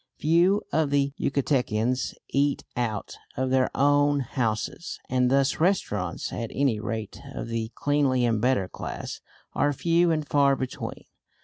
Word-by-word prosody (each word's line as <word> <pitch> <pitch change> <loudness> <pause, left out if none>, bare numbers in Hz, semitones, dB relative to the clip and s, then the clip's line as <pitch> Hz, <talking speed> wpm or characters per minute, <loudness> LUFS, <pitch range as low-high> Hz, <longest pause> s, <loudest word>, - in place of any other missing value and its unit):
Few 170 +6 +3
of 155 -2 +2
the 140 -1 +1
Yucatecans 125 -3 0
eat 140 +1 +1
out 110 -4 -3 0.2
of 130 0 0
their 130 -1 +3
own 145 0 +3
houses, 120 +5 -3
and 125 -1 +3
thus 135 +1 +2
restaurants 105 - 0
at 115 -2 -3
any 135 -6 +2
rate 110 -1 -5
of - - -5
the 115 0 -3
cleanly 140 -4 +2
and 115 -3 +1
better 125 -6 +2
class - - -6 0.3
are 145 - +2
few 170 +4 +2
and 155 -2 0
far 140 -1 +4
between. 130 -1 -5
135 Hz, 140 wpm, -26 LUFS, 115-145 Hz, 0.3 s, far